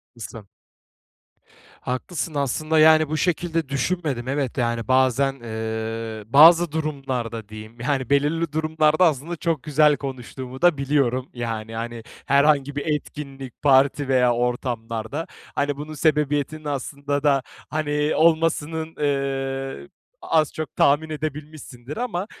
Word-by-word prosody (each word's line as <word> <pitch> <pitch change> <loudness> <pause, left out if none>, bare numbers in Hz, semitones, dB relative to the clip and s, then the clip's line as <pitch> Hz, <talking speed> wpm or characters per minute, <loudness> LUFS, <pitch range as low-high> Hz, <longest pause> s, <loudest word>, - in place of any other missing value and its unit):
Haklısın. 115 -2 -9 1.3
Haklısın. 150 +5 -4
Aslında, 155 +3 0
yani, 155 0 +6
bu 155 - -1
şekilde 165 -2 -1
düşünmedim, 140 -3 -2
evet, 135 -2 -2
yani. 115 -2 -1
Bazen, 130 +1 +3
eee, 110 -1 -4
bazı 160 +6 +7
durumlarda, 130 -8 -3
diyeyim, 110 +2 -11
yani, 130 0 -1
belirli 150 +3 +1
durumlarda, 155 +1 +2
aslında, 160 +1 0
çok 165 -4 -1
güzel 150 -1 +4
konuştuğumu 130 0 -7
da 175 -3 +5
biliyorum, 135 -2 0
yani. 115 -2 -4
Hani, 115 0 -5 0.2
herhangi 140 0 +3
bir 145 - -3
etkinlik, 140 -4 -9
parti 140 0 +4
veya 125 -2 +4
ortamlarda, 120 +2 -3 0.3
hani, 145 0 0
bunun 150 +2 -7
sebebiyetinin, 150 0 0
aslında 140 0 -3
da, 140 -2 +3 0.3
hani, 150 -1 0
olmasının, 160 0 +1
eee, 135 - -2 0.3
az 155 -2 +1
çok 155 -3 -6
tahmin 145 +3 +3
edebilmişsindir. 150 -3 -6
Ama, 205 -6 -2
140 Hz, 120 wpm, -23 LUFS, 125-155 Hz, 1.3 s, bazı